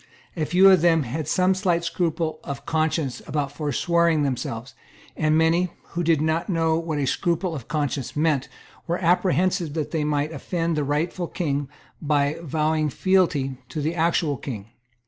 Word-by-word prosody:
A 160 -3 -1
few 185 +2 +6
of 185 -4 +5
them 165 -2 +4
had 140 +5 -4
some 185 +1 +3
slight 180 -3 0
scruple 165 -2 -1
of 140 -1 -6
conscience 155 -5 -1
about 145 -2 -2
foreswearing 160 +2 +1
themselves; 125 -2 -3 0.4
and 155 0 +2
many, 165 +3 +3 0.2
who 175 - -3
did 160 -2 +2
not 160 +4 0
know 165 -3 +2
what 165 -2 -3
a 145 - 0
scruple 170 +6 0
of 135 -7 -7
conscience 145 -4 -2
meant, 150 -3 +1 0.4
were 170 +1 0
apprehensive 180 -2 +1
that 155 -3 -2
they 160 -2 0
might 150 0 0
offend 165 0 -2
the 150 - 0
rightful 160 +5 -1
King 145 -6 -2 0.3
by 145 -1 +1
vowing 155 0 0
fealty 150 -6 +1
to 155 - -4
the 155 +3 -1
actual 165 -3 +1
King. 115 -5 -7
160 Hz, 165 wpm, -24 LUFS, 145-170 Hz, 0.4 s, few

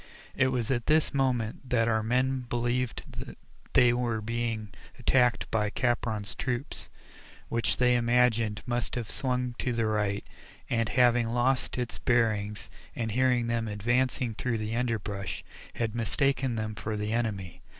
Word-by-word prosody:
It 135 - +3
was 125 -2 0
at 120 -3 -1
this 155 0 +3
moment 130 -2 0
that 115 -2 +3
our 110 -1 +2
men 130 +4 +1
believed 120 +1 -1 0.7
they 120 -1 +6
were 120 -2 0
being 115 -1 -2 0.3
attacked 125 -3 +2
by 105 -2 +1
Capron's 110 -2 -1
troop, 130 +2 -3 0.8
which 115 -1 0
they 125 -1 +4
imagined 120 -3 +2
must 120 -1 -2
have 120 -3 -4
swung 125 -2 -1
to 125 - 0
the 115 -1 +1
right, 105 -2 0 0.5
and 115 -2 +1
having 120 -2 +4
lost 125 +3 +1
its 125 -2 -3
bearings 110 -4 +1 0.3
and 110 -2 -2
hearing 125 0 +2
them 115 -1 -1
advancing 120 +3 0
through 115 +1 -1
the 110 +1 -3
underbrush, 105 -5 -2 0.3
had 115 -2 -1
mistaken 130 +2 +1
them 110 -1 -2
for 105 0 -4
the 105 +1 -2
enemy. 105 -7 -2
120 Hz, 145 wpm, -29 LUFS, 110-125 Hz, 0.8 s, they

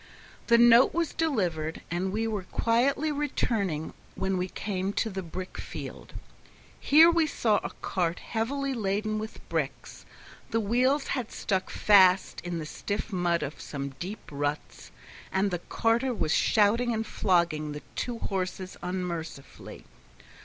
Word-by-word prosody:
The 235 - +6
note 240 +4 +6
was 335 -2 0
delivered, 175 - -1
and 180 +2 -1
we 220 +3 -1
were 210 -4 -3
quietly 270 +6 +2
returning 220 - -1 0.2
when 190 0 -1
we 180 - -1
came 195 0 -3
to 220 - -1
the 190 0 -4
brick 185 +2 -7
field. - - -8 0.7
Here 320 +4 +7
we 335 -2 +2
saw 225 -7 +2
a - - -3
cart 175 -2 0
heavily 270 +5 -2
laden 215 -1 -1
with 220 +1 -8
bricks; - - -4 0.5
the 225 - +1
wheels 250 +7 +1
had 250 -5 -2
stuck 190 -2 -1
fast 190 -3 +4
in 175 -1 -3
the 160 - -4
stiff 205 +6 -4
mud 175 -2 +1
of 140 - -6
some 140 -1 -5
deep 200 +4 -6
ruts, 145 +1 -4 0.4
and 195 +1 +1
the 175 - -1
carter 235 +7 0
was 155 -6 0
shouting 230 +3 +3
and 220 0 -2
flogging 170 -8 +1
the 150 - -8
two 245 -2 -3
horses 185 -3 -3
unmercifully. 175 -6 -6
200 Hz, 145 wpm, -28 LUFS, 175-235 Hz, 0.7 s, Here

